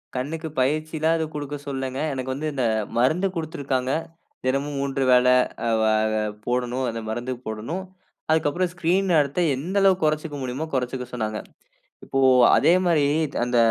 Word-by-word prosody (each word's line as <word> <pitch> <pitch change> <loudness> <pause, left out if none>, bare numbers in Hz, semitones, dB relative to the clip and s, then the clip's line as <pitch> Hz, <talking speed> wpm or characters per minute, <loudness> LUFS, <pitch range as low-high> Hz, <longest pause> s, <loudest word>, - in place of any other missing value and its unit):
கண்ணுக்கு 155 +6 -3
பயிற்சிலாம் 155 +4 +1
எதுவும் 160 -1 -3
குடுக்க 145 0 -4
சொல்லங்க. 135 -1 -3
எனக்கு 130 0 -3
வந்து 150 +4 -3
இந்த 130 -2 -1 0.3
மருந்து 155 +11 +3
குடுத்திருக்கிறாங்க. 140 -5 -2 0.5
தினமும் 140 +2 -1
3 135 0 -1
வேல 125 0 +5 0.4
ஆ - - 0
வ - - +3 0.3
ஆ - - 0 0.2
போடணும் 125 +1 -1
அந்த 115 0 -4
மருந்து 120 +3 -3
போடணும். 115 - -4 0.5
அதுக்கப்புறம் 160 +3 +1
ஸ்கிரீன் 180 +2 +1
நேரத்த 145 0 +2 0.2
எந்த 170 +10 -3
அளவு 195 -1 +5
குறச்சுக்க 155 0 0
முடியுமோ 130 +4 -3
குறச்சுக்க 125 0 -2
சொன்னாங்க. 110 -3 -2 0.7
இப்போ 135 - -1 0.4
அதே 170 - +5
மாரி 160 -5 +3 0.4
அந்த 120 0 0
140 Hz, 145 wpm, -24 LUFS, 125-160 Hz, 0.7 s, வேல